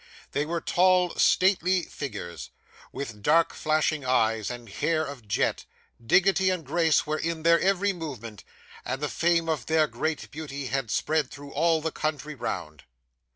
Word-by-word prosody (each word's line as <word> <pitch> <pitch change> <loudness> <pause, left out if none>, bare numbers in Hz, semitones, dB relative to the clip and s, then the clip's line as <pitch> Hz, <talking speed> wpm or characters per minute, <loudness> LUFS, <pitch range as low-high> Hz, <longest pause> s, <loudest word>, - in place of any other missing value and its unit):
They 145 +1 -1
were 170 0 -2
tall 180 -1 +3
stately 185 -1 +3
figures, 85 - -7 0.4
with 115 -7 -6
dark 165 +8 +3
flashing 155 -1 0
eyes 110 -4 +1
and 120 -1 -7
hair 155 +10 0
of 135 -7 -9
jet; 100 - 0 0.4
dignity 190 - +4
and 180 -4 -2
grace 160 +2 +2
were 155 0 -2
in 165 -1 -3
their 170 0 +5
every 195 +1 +2
movement; 125 - -7 0.4
and 130 - -3
the 150 0 -2
fame 170 -1 +1
of 155 -8 -2
their 160 -1 +4
great 155 +1 -3
beauty 140 -2 -6
had 130 -2 -2
spread 155 +4 0
through 145 0 -11
all 165 +1 +2
the 160 +1 -2
country 155 -1 -3
round. 80 - -5
155 Hz, 155 wpm, -27 LUFS, 130-165 Hz, 0.4 s, their